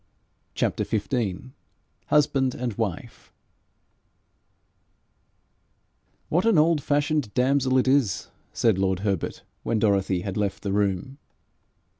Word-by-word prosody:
CHAPTER - - 0
XV 110 0 -2 0.6
HUSBAND 135 -3 +2
AND 120 -2 -3
WIFE 100 -5 -5 3.0
'What 175 +4 +1
an 225 -5 +3
old 155 0 +3
fashioned 145 -4 0
damsel 130 +1 +2
it 130 - +2
is!' 130 -8 +1 0.2
said 110 -5 +1
lord 95 -1 0
Herbert 100 -4 -2 0.2
when 115 - -1
Dorothy 100 -4 +1
had 100 +1 -4
left 100 -2 -2
the 100 -2 -2
room. 100 +7 -1
115 Hz, 105 wpm, -25 LUFS, 100-140 Hz, 3.0 s, an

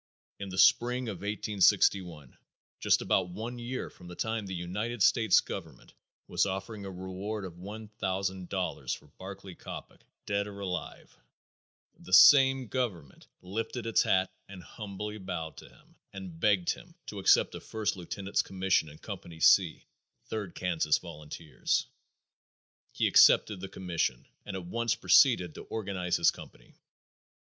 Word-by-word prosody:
In 100 -1 -6
the 95 - -7
spring 125 +4 +4
of 100 - -5
1861, 95 -6 +1 0.4
just - - +3
about 95 -2 +1
one 115 +7 -6
year 125 +2 -4
from 90 - -15
the 90 - -9
time 110 +1 -2
the 95 - -4
United 105 +6 -2
States 110 -2 +5
Government - - -9 0.3
was - - +1
offering 100 +2 -5
a - - -5
reward 95 +3 -5
of 85 -2 -10
one 105 +4 -8
thousand 95 -3 -3
dollars 95 -2 -2
for 75 - -17
Barclay 95 0 -9
Coppock, - - -10 0.2
dead 100 0 -1
or 100 -1 -9
alive, 90 -3 -5 0.8
the 95 - -9
same 135 +3 +8
government 100 - -4 0.2
lifted 110 +5 -4
its 115 - +3
hat 95 0 +1 0.2
and 95 -3 -10
humbly 105 +1 -7
bowed 80 -4 -5
to - - -12
him, - - -23 0.2
and 95 -4 -9
begged 100 -3 +3
him 170 -1 -10
to 105 - -7
accept 95 - +4
a - - -6
first 105 -1 -2
lieutenant's 95 +2 -2
commission 95 -4 0
in 75 - -13
Company 80 +1 -9
C, 85 0 +4 0.4
Third 105 -5 -5
Kansas 85 -4 +1
volunteers. 75 +1 -3 1.1
He - - 0
accepted 105 -3 +5
the 95 +1 -7
commission 85 -10 -2 0.2
and 100 - -5
at 95 -2 -6
once 115 +5 0
proceeded 90 - +4
to - - -9
organize 95 -5 -2
his - - +4
company. - - -14
95 Hz, 150 wpm, -30 LUFS, 90-110 Hz, 1.1 s, same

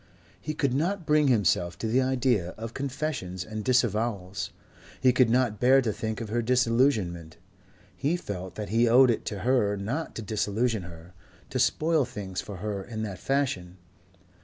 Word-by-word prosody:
He 155 - -4
could 140 -5 0
not 175 +6 -1
bring 150 -1 +3
himself 90 -7 +2
to - - -5
the 125 +4 +3
idea 125 -8 +1
of 115 +1 -6
confessions 135 - -3
and 110 -1 -5
disavowals. 105 -6 0 0.5
He 130 -1 +4
could 125 -2 +4
not 120 -3 +1
bear 130 +2 +6
to 115 -5 0
think 110 +1 -4
of 110 - -5
her 120 +2 0
disillusionment. 115 - +1 0.6
He 150 +5 0
felt 95 - -6
that 105 -3 -5
he 115 +2 +3
owed 125 +1 +7
it 115 - -3
to 100 -3 -4
her 105 -4 +2
not 120 +12 -4
to 110 - -5
disillusion 110 +2 0
her, 85 0 -12 0.4
to - - -1
spoil 160 -1 +2
things 100 -6 -5
for 100 - -8
her 100 0 -4
in 110 +1 -5
that 100 -4 -5
fashion. 110 -11 -1
115 Hz, 170 wpm, -27 LUFS, 100-130 Hz, 0.6 s, owed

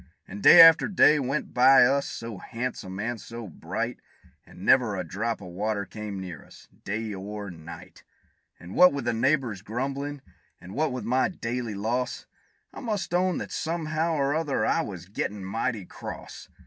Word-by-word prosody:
And 100 +2 -8
day 175 - +9
after 165 -1 +9
day 155 -6 +5
went 140 +2 -3
by 130 +1 +7
us, 140 +2 +1
so 115 -4 -7
han'some 115 -6 -5
and 115 +1 -3
so 115 -1 -8
bright, 85 - -4 0.5
And 90 - -11
never 120 -6 +4
a 90 - -3
drop 110 +7 -3
of 90 - -9
water 100 +3 -2
came 105 -2 -7
near 90 -5 -8
us, - - -17 0.2
day 105 +1 -3
or 100 +1 -6
night; 80 -1 -12 0.6
And 85 +2 -10
what 180 -3 +7
with 140 -4 -4
the 120 - +1
neighbors' 120 -4 0
grumblin', 135 +6 -4 0.4
and 90 +2 -11
what 155 +4 0
with 125 0 -5
my 130 +2 +2
daily 120 - -4
loss, 120 +5 -2 0.5
I - - -8
must 210 -8 -3
own 180 0 +2
that - - -6
somehow 160 0 -1
or 140 -1 +1
other 150 -3 0
I 165 - +2
was 90 - -7
gettin' 100 +1 -4
mighty 110 +1 -2
cross. - - -9
115 Hz, 175 wpm, -26 LUFS, 100-140 Hz, 0.6 s, day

